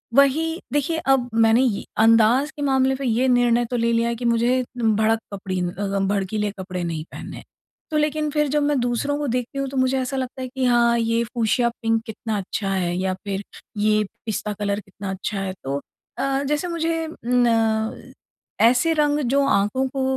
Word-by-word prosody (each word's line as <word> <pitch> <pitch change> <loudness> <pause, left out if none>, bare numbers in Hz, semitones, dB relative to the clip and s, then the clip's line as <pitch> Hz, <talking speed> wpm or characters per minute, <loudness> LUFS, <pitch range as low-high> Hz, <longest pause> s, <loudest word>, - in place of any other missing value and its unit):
वही 320 +5 +3
देखिए 290 +3 0
अब 265 -2 +3
मैंने 225 +1 +4
ये 225 -6 -1 0.2
अंदाज़ 230 +6 +4
के - - -6
मामले 265 0 +3
पर 275 - -6
ये 245 +2 +2
निर्णय 240 -1 +3
तो - - 0
ले 235 0 +1
लिया 230 0 +2
है 235 - -1
कि 240 +1 -6
मुझे 240 +2 +2 0.2
भड़क 220 0 +2
कपड़ी 190 -2 -3 0.5
भड़कीले 205 +1 -1
कपड़े 185 -1 -4
नहीं 165 -2 -3
पहनने - - -8
हैं। - - -11 0.5
तो 305 - +1
लेकिन 300 0 0
फिर 300 0 +1
जब 295 +1 +1
मैं 290 0 +2
दूसरों 245 +4 0
को 295 -1 -2
देखती 250 +2 -2
हूँ 275 - -1
तो 270 - -5
मुझे 260 +1 +2
ऐसा 260 +1 -2
लगता 260 0 -4
है 255 - -3
कि 260 0 -2
हाँ 235 -1 +4
ये 230 0 +1
फ्यूशिया 235 +1 +1
पिंक 225 0 +1
कितना 220 -1 -4
अच्छा 195 +1 -3
है 180 -2 0
या 185 0 0
फिर 200 0 -3 0.3
ये 215 0 +3 0.2
पिस्ता 215 -1 -2
कलर 200 0 -1
कितना 200 -1 -8
अच्छा 195 +2 -3
है। 190 -1 -3
तो 140 +1 -2 0.4
अ, 275 0 0
जैसे 295 +5 -1
मुझे 330 -1 -1 0.2
ना, 225 -3 +1 0.5
ऐसे 255 +8 +4
रंग 295 -1 +2
जो 280 0 +3
आँखों 235 +4 +1
को 265 0 -2
240 Hz, 190 wpm, -22 LUFS, 215-270 Hz, 0.5 s, मैंने